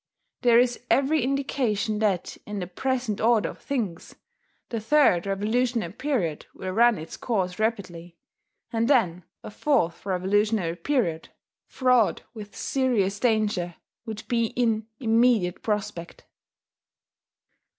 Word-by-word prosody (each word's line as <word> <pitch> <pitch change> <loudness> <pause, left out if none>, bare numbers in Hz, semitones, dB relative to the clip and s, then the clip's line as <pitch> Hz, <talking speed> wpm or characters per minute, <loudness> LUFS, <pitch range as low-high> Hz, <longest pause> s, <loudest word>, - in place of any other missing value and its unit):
There 240 -2 +5
is 245 0 +2
every 280 +3 +3
indication 245 -5 -1
that, 200 -5 0
in 210 0 -5
the 185 - -3
present 245 +3 -2
order 220 -5 +3
of - - -11
things, 215 -12 -4 0.5
the 230 - -2
third 220 - +3
revolutionary 220 0 0
period 215 - -2
will 185 - -5
run 235 +3 +4
its 160 +1 -8
course 190 -6 -2
rapidly; 180 -6 -3 0.6
and 230 0 +1
then 180 - +2 0.2
a - - -8
fourth 210 - 0
revolutionary 190 -1 +1
period, 195 - -1 0.4
fraught 250 -4 +2
with 210 -3 -10
serious 220 -8 0
danger, 210 -7 0 0.3
would 220 -1 -5
be 230 -1 +1
in 225 -2 0
immediate 225 -6 +2
prospect. 200 -5 -4
215 Hz, 120 wpm, -25 LUFS, 185-245 Hz, 0.6 s, There